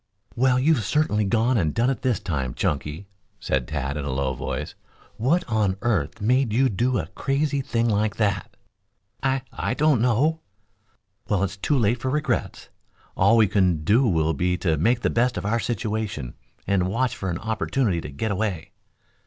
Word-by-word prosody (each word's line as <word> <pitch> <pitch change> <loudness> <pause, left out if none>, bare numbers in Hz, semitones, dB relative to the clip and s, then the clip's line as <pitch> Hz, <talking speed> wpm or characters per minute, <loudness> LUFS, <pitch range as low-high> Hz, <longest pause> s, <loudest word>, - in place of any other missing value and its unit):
"Well, 125 +1 +3
you've 140 -3 +3
certainly 105 -3 +1
gone 115 +3 +2
and 80 -5 0
done 120 +3 +2
it 130 - -4
this 125 -6 +1
time, 70 -8 -3
Chunky," 75 +5 -2 0.3
said 65 -3 -1
Tad 70 -1 -3
in 75 - -3
a 70 - -3
low 65 0 -1
voice. - - -4 0.4
"What 155 +10 +2
on 105 -4 +1
earth 100 -8 0
made 125 +3 +2
you 130 +4 +3
do 120 +4 0
a - - -2
crazy 140 +3 0
thing 115 -2 0
like 105 -1 +1
that?" 100 -2 -1 0.6
"I 135 -1 0
I 125 - -2
don't 150 -5 +3
know." 130 +7 +2 0.9
"Well, 100 -2 +2
it's 100 0 -2
too 140 +8 0
late 120 0 +2
for 130 - -1
regrets. 150 +2 -2 0.5
All 100 +5 +4
we 110 - +6
can 90 -5 +1
do 120 - +3
will 80 -4 +1
be 90 +4 0
to 80 -4 +1
make 115 - +1
the - - +1
best 125 +1 +1
of - - -4
our 115 +3 +1
situation 110 - -3 0.3
and 95 -2 +1
watch 120 +5 0
for 95 - -4
an 85 - -2
opportunity 110 -2 -1
to - - -7
get 85 +10 -3
away." 100 -5 -2
110 Hz, 180 wpm, -24 LUFS, 90-125 Hz, 0.9 s, we